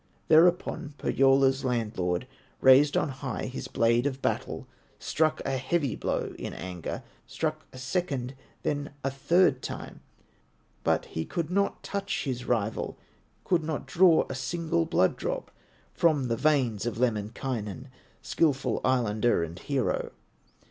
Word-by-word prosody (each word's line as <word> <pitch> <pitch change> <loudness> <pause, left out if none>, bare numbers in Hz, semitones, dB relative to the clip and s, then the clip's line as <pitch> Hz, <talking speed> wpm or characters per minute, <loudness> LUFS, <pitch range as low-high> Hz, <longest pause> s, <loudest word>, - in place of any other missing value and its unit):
Thereupon 160 -2 +3
Pohyola's 135 0 +3
landlord 110 -6 -1 0.3
Raised 135 +3 +6
on - - +1
high 135 -1 -4
his 130 - -5
blade 115 +3 +2
of 135 -1 -3
battle, - - -2 0.3
Struck 155 0 0
a 135 -1 0
heavy 140 +1 0
blow - - -2
in - - -5
anger, 90 -2 -5 0.2
Struck 155 -1 -3
a - - -11
second, 135 -2 -2 0.3
then 145 -1 -1
a 135 - 0
third 135 0 +3
time, - - -7 0.8
But - - +1
he 80 - -4
could 165 - -3
not 200 +2 0
touch 200 0 -2
his 125 -3 -3
rival, 110 -3 -1 0.5
Could 175 -3 +1
not 155 -3 -3
draw 165 +5 +5
a - - -5
single 165 +4 -1
blood 170 - +2
drop - - -3 0.4
From 150 -7 +2
the 115 - +1
veins 125 -6 +1
of 120 - -3
Lemminkainen, 115 +1 -2 0.3
Skillful 135 +1 +1
Islander 120 -5 +2
and 85 +2 -6
hero. 135 -4 -1
135 Hz, 135 wpm, -28 LUFS, 120-155 Hz, 0.8 s, Raised